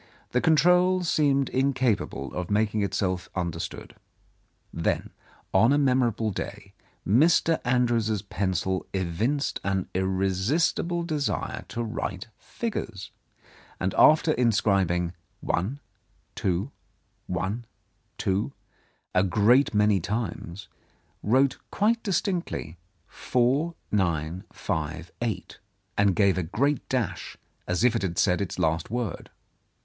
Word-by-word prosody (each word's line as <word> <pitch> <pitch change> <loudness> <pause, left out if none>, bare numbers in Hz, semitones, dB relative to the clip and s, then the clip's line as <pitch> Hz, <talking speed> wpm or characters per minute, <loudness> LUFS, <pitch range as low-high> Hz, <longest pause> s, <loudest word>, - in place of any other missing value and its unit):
The 125 - +2
control 180 +4 +4
seemed 140 -5 +2
incapable 130 -4 0
of 90 -1 -4
making 105 +1 +1
itself 90 -2 -1
under 85 -3 -2
stood. - - -6 0.8
Then 85 - -1 0.4
on 115 +6 +5
a 145 - +4
memorable 125 -6 +2
day 100 +1 -6 0.3
Mr. 160 - +4
Andrews's 120 -4 +1
pencil 95 -2 -1
evinced 100 - -1
an 95 -2 -1
irresistible 95 - 0
desire 155 -4 -2
to 120 - -3
write 105 -2 -4
figures, 115 - -5 0.7
and 95 +1 -1
after 155 +1 +6
inscribing 100 - +2 0.3
"one, 110 +11 -1 0.5
two, 95 +8 -1 0.6
one, 95 +6 -2 0.5
two," 100 +8 -1 0.6
a 90 - +4
great 105 +8 +4
many 105 -1 +4
times, 95 -2 -4 0.5
wrote 130 +5 +2
quite 230 +3 +1
distinctly 175 - -2 0.3
4958, 95 - -2 0.4
and 100 -2 +3
gave 100 -3 +3
a - - -1
great 140 - 0
dash 125 -4 -2 0.3
as 90 +4 0
if 125 -1 +4
it 115 - 0
had 90 -3 -2
said 90 0 +3
its 100 - -3
last 80 0 0
word. 120 -1 -3
105 Hz, 105 wpm, -26 LUFS, 95-135 Hz, 0.8 s, after